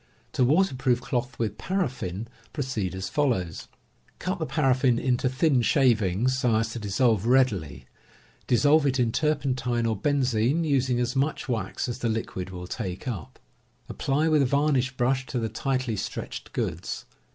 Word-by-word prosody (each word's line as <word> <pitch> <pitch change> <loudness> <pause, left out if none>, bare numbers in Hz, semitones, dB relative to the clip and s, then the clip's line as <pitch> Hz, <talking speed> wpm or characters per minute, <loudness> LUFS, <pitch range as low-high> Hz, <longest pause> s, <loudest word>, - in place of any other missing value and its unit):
To 130 - +1
waterproof 130 -4 +2
cloth 125 0 -3
with 110 -3 -2
paraffin, 125 - -2 0.3
proceed 115 - -2
as 95 0 -4
follows: 105 - -1 0.5
Cut 185 -1 -3
the 160 - -2
paraflBn 130 -4 +2
into 130 0 +1
thin 130 0 +2
shavings, 120 - +2
so 120 -3 +2
as 110 +1 +1
to 120 - -5
dissolve 110 0 +1
readily. 105 - +2 0.6
Dissolve 145 +4 +4
it 135 -1 +1
in 120 -2 +2
turpentine 130 -5 0
or 110 -1 +1
benzin, 130 +4 +1
using 130 -5 +1
as 120 +2 -1
much 140 +3 0
wax 110 -5 -2
as 120 0 -4
the 120 - 0
liquid 110 -4 -3
will 90 -1 -7
take 90 +4 -5
up. 100 - -5 0.5
Apply 145 +4 0
with 155 -2 +4
a 135 - +3
varnish 140 -1 +2
brush 130 +1 +1
to 130 - -3
the 115 -2 -1
tightly 130 -1 -1
stretched 95 - -5
goods. - - -3
125 Hz, 155 wpm, -26 LUFS, 110-135 Hz, 0.6 s, Dissolve